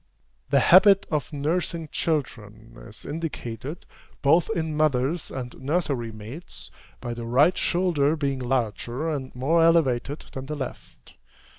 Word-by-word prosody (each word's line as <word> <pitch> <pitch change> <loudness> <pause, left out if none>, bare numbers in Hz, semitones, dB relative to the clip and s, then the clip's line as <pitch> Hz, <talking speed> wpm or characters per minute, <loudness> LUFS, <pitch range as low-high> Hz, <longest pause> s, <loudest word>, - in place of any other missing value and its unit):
The 140 -1 +4
habit 195 +4 +7
of 150 -4 -1
nursing 160 +2 -2
children 115 - -3
is - - -10
indicated, 145 -2 -5 0.4
both 160 +7 +4
in 160 -7 -2
mothers 150 +1 +1
and 125 -2 -6
nursery 135 -5 -1
maids, 110 +10 -10 0.3
by 120 -1 -4
the 120 -1 -6
right 145 +9 +4
shoulder 165 -5 +1
being 140 -3 -1
larger 125 +3 -2
and 135 -3 -4
more 150 +7 +2
elevated 145 -4 +2
than 135 0 -6
the 150 - -3
left. 135 -3 -8
145 Hz, 130 wpm, -25 LUFS, 125-165 Hz, 0.4 s, habit